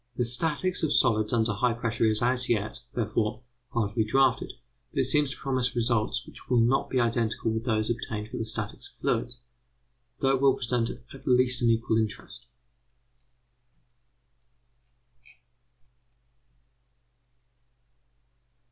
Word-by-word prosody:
The 125 - +1
statics 155 +8 +1
of 160 - 0
solids 110 -2 +3
under 115 -2 +1
high 120 +4 +1
pressure 115 0 -1
is 110 +1 +1
as 125 +1 +2
yet, 105 -2 -1 0.2
therefore, 110 0 -1 0.3
hardly 110 -1 0
drafted, 130 +3 +1 0.4
but - - -1
it - - +2
seems 145 +2 +2
to 135 - -6
promise 130 -3 -1
results 120 +1 0
which - - -15
will 125 -2 +3
not 120 +4 +2
be 130 - +1
identical 115 -1 0
with 110 +1 -3
those 110 -3 0
obtained 110 -2 -4
for - - -5
the 110 - -2
statics 110 - -4
of - - -38
fluids, 120 0 -1 0.8
though 135 - +2
it 135 -1 +1
will 135 -1 +5
present 120 -1 0
at 135 +3 -11
least 125 -1 +3
an 120 - +3
equal 115 -1 +2
interest. 110 +2 -5
120 Hz, 130 wpm, -27 LUFS, 110-125 Hz, 0.8 s, will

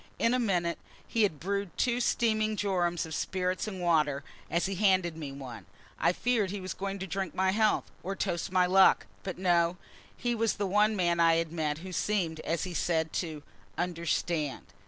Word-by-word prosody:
In 230 - +2
a 255 - +2
minute 175 -7 0 0.3
he 230 - 0
had 190 -9 +2
brewed 200 +1 -3
two 245 -1 +1
steaming 215 -3 +1
jorums 175 -4 0
of 160 - -7
spirits 185 +4 -1
and 195 -3 -5
water; 155 -5 +2 0.3
as 170 +1 +1
he 195 - -1
handed 185 -4 +2
me 150 -4 -6
one, 130 -4 -9 0.3
I - - +4
feared 220 0 +1
he 200 +1 -4
was 185 -1 -5
going 195 0 -4
to 190 - -4
drink 195 0 -3
my 190 0 +2
health, 215 +1 +2 0.2
or 195 +3 -4
toast 175 -3 -2
my 185 -1 +4
luck; 190 +1 +5 0.2
but 190 - -5
no, 175 -1 +2 0.4
he 240 -1 -1
was 230 -1 +1
the 205 - -2
one 210 +3 +3
man 175 -3 +1
I 165 -1 +5
had 165 -1 0
met 155 -3 -1
who 190 - -6
seemed, 175 -6 0
as 165 +1 -2
he 185 - -4
said, 160 -2 0
to 155 -4 -6 0.3
"understand." 170 -4 -1
185 Hz, 195 wpm, -30 LUFS, 170-200 Hz, 0.4 s, luck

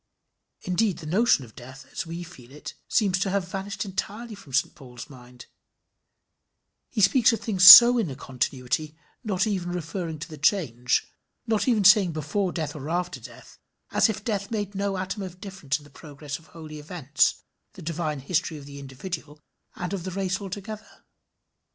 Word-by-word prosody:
Indeed 190 +1 0
the 160 - -10
notion 180 - +2
of 110 - -17
death, 130 +2 -12
as - - -5
we 170 +1 -6
feel 135 -8 -14
it, 150 - -9
seems 195 -4 +1
to 195 - 0
have 190 -1 -1
vanished 200 +1 -4
entirely 210 +4 -5
from 195 -9 -13
St 135 - +1
Paul's 125 +1 -12
mind 125 -1 -14 1.4
he 215 - -2
speaks 225 +5 +5
of 230 - -2
things 190 -5 +1
so 240 +5 +12
in 205 -8 -1
a 135 - -6
continuity, 135 +4 -3 0.3
not 195 -5 0
even 190 -5 -2
referring 170 -1 -4
to 155 - -7
the 155 -3 -11
change 135 - +1 0.4
not 225 -1 0
even 225 -5 +2
saying 195 -3 +6
before 160 +6 -2
death 155 -4 -4
or 150 0 -7
after 180 +1 -2
death, - - -14 0.3
as - - +3
if 220 - -4
death 200 -4 -2
made 205 -3 -3
no 200 -1 -2
atom 190 +3 -4
of 185 -1 -8
difference 190 -8 -4
in 150 - -16
the 145 - -18
progress 145 -1 -8
of 160 - -21
holy 155 -2 -10
events, 150 -2 0 0.4
the 190 -4 -12
divine 155 -3 -3
history 155 +2 -1
of 140 - -11
the 140 0 -10
individual 150 +3 -7 0.4
and 180 +2 -5
of 190 -4 -4
the 190 - -4
race 190 0 -2
together. 210 +3 -9
175 Hz, 180 wpm, -25 LUFS, 145-200 Hz, 1.4 s, so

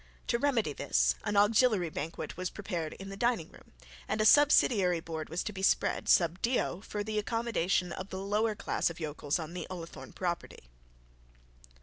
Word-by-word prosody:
To 235 - +2
remedy 235 - +1
this, - - +2
an 210 - 0
auxiliary 210 -4 +4
banquet 155 +3 -5
was 185 0 -3
prepared 175 -6 -4
in 195 0 -9
the 195 - -6
dining 235 -5 0
room, - - -18 0.4
and - - -1
a 215 - +3
subsidiary 215 - +5
board 160 -1 -6
was 165 +3 -2
to 210 - -4
be 190 - -6
spread 195 - +1
sub 175 +1 +3
dio 230 -6 0
for 210 0 -4
the 215 0 -1
accommodation 205 -5 0
of 185 +2 -6
the 190 - -5
lower 210 +3 0
class - - 0
of 170 - -9
yokels 150 -2 -2
on 165 -1 -6
the 180 -2 -5
Ullathorne 165 -7 -8
property. 175 - -4
190 Hz, 180 wpm, -31 LUFS, 165-215 Hz, 0.4 s, subsidiary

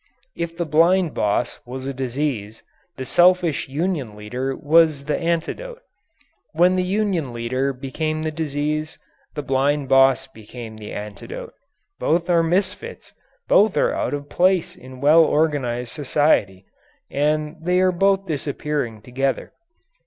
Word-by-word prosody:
If 170 0 -4
the 170 - -1
blind 165 +3 +3
boss 105 +3 -1
was 130 +1 -7
a 135 - -3
disease, 130 -4 -3 0.3
the 130 - -5
selfish 175 -3 +3
union 145 - -2
leader 125 +6 -4
was 155 -2 +3
the 150 - 0
antidote. 175 - -2 0.7
When 175 +3 +4
the 185 - +2
union 185 - -1
leader 130 +4 -1
became 155 +4 -3
the 155 - -1
disease, 155 0 -2 0.4
the 150 - -3
blind 140 +1 0
boss 135 0 +5
became 110 -2 -10
the 105 -1 -9
antidote. 455 - -7 0.5
Both 170 +2 +1
are 170 -1 +4
misfits, 190 - -2 0.3
both 205 -5 +4
are - - +2
out - - -1
of 145 0 -7
place 180 +3 +1
in 130 0 -12
well 155 +3 +6
organized 135 -7 0
society. 130 -10 +1 0.5
And 150 +2 0
they 180 +2 +1
are 185 0 +4
both 195 +2 +2
disappearing 145 - -3
together. 135 +2 -2
150 Hz, 135 wpm, -22 LUFS, 130-170 Hz, 0.7 s, well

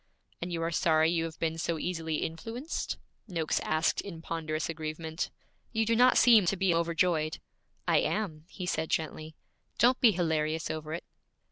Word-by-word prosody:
'And 175 +1 -4
you 165 -1 -2
are 165 - -1
sorry 160 -1 +3
you 165 -1 +1
have 165 -1 -7
been 165 0 -1
so 165 0 -1
easily 160 -2 -2
influenced?' 230 - -4 0.3
Noakes 165 -5 0
asked 155 +1 +1
in 175 -5 -8
ponderous 155 -2 -3
aggrievement. 160 +1 -4 0.4
'You 225 0 +2
do 230 +1 +2
not 250 +2 +6
seem 225 -7 +7
to 195 - +2
be 190 -1 +2
overjoyed.' 165 -1 +1 0.5
'I - - +4
am,' 160 -8 -2
he 185 - -6
said 160 -2 -1
gently. 155 0 -2 0.4
'Don't 245 +4 +4
be 240 - +8
hilarious 160 -3 0
over 155 0 -5
it.' 170 - -6
165 Hz, 165 wpm, -30 LUFS, 160-180 Hz, 0.5 s, be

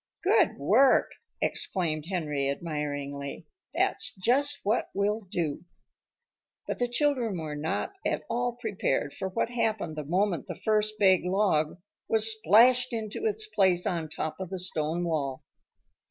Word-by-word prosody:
"Good 390 -3 +3
work!" 225 - +4 0.3
exclaimed 160 -5 0
Henry 150 -7 -1
admiringly. 145 -2 -4 0.3
"That's - - 0
just 275 +9 +2
what 215 +4 0
we'll 205 +3 0
do." 160 -5 -2 1.0
But - - -3
the 245 - +1
children 245 -5 0
were 155 -2 -5
not 160 - -2
at - - -1
all 245 0 -1
prepared 190 - -1
for 190 - -4
what 225 +4 -1
happened 215 -9 -1
the 155 - -4
moment 175 0 0
the - - -5
first 215 0 +1
big 190 -4 +4
log 180 -5 +1 0.3
was 220 0 +4
splashed 245 +4 +5
into 225 - -3
its 435 0 -1
place 190 - +2
on 165 -3 -2
top 155 +2 -4
of 190 -2 -5
the 190 - -4
stone 170 -2 -1
wall. 145 -6 -2
190 Hz, 140 wpm, -28 LUFS, 155-225 Hz, 1.0 s, splashed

